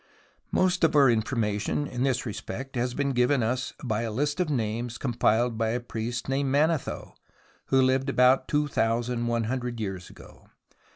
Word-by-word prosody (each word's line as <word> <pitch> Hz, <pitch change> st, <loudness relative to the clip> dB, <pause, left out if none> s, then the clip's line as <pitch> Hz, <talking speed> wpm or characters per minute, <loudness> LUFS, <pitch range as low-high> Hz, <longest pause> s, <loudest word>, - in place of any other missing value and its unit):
Most 180 Hz, -1 st, +1 dB
of 160 Hz, -, +3 dB
our 140 Hz, -4 st, +6 dB
information 110 Hz, +2 st, -1 dB
in 125 Hz, -3 st, -5 dB
this 130 Hz, -1 st, 0 dB
respect 120 Hz, +4 st, -6 dB
has 125 Hz, 0 st, -1 dB
been 140 Hz, -1 st, 0 dB
given 125 Hz, 0 st, +2 dB
us 125 Hz, +3 st, -2 dB
by 110 Hz, -4 st, -1 dB
a 115 Hz, -, -2 dB
list 145 Hz, +8 st, -1 dB
of 180 Hz, -3 st, +1 dB
names 120 Hz, -2 st, -2 dB
compiled 120 Hz, -2 st, +1 dB
by 110 Hz, -1 st, +1 dB
a 120 Hz, +2 st, -1 dB
priest 120 Hz, 0 st, -4 dB
named 135 Hz, +1 st, 0 dB
Manetho, 150 Hz, +1 st, 0 dB, 0.5 s
who 135 Hz, -, +2 dB
lived 130 Hz, +1 st, +2 dB
about 130 Hz, 0 st, +4 dB
two 150 Hz, 0 st, +1 dB
thousand 120 Hz, -1 st, 0 dB
one 115 Hz, -1 st, 0 dB
hundred 120 Hz, 0 st, -3 dB
years 95 Hz, -4 st, -5 dB
ago. -, -, -16 dB
125 Hz, 170 wpm, -27 LUFS, 115-135 Hz, 0.5 s, our